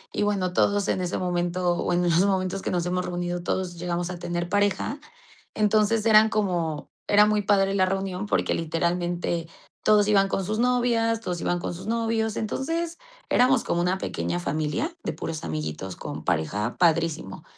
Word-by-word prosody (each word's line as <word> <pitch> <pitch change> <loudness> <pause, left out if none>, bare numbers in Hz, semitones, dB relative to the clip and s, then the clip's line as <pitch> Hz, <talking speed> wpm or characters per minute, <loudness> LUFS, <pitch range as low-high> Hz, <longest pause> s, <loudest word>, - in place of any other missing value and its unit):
Y - - 0
bueno, 195 -3 0
todos 205 +1 +2
en 185 - 0
ese 180 -1 -2
momento, 175 0 0
bueno, 175 0 +1
en 175 +3 +3
momentos 190 0 0
que - - -3
nos 175 -1 -1
hemos 180 +1 -1
reunido, 175 0 -3
todos 180 -1 -2
llegamos 175 0 -2
a 175 - -7
tener 175 0 -3
pareja. 205 +8 0 0.6
Entonces 215 +1 +2
eran 220 -1 +6
como 175 -8 -1 0.2
era 210 0 +6
muy 210 0 +2
padre 195 -1 +3
la 190 -1 +4
reunión 195 +1 -2
porque - - +1
literalmente 170 +1 -1 0.4
todos 210 -1 +4
iban 200 -2 +4
con 195 - -1
sus 215 +3 -2
novias, 240 -2 +2
todos 180 -6 -4
iban 175 0 0
con - - -4
sus 185 +4 -9
novios. 225 -1 0
Entonces 330 +9 -2 0.3
éramos 255 +2 +4
como 175 - 0
una 180 +2 +1
pequeña 175 -2 -3
familia 155 - -2
de - - -2
puros 160 -1 -5
amiguitos 80 +4 -4
con - - -6
pareja 105 +9 -1
padrísimo. 165 - +1
185 Hz, 170 wpm, -25 LUFS, 175-210 Hz, 0.6 s, eran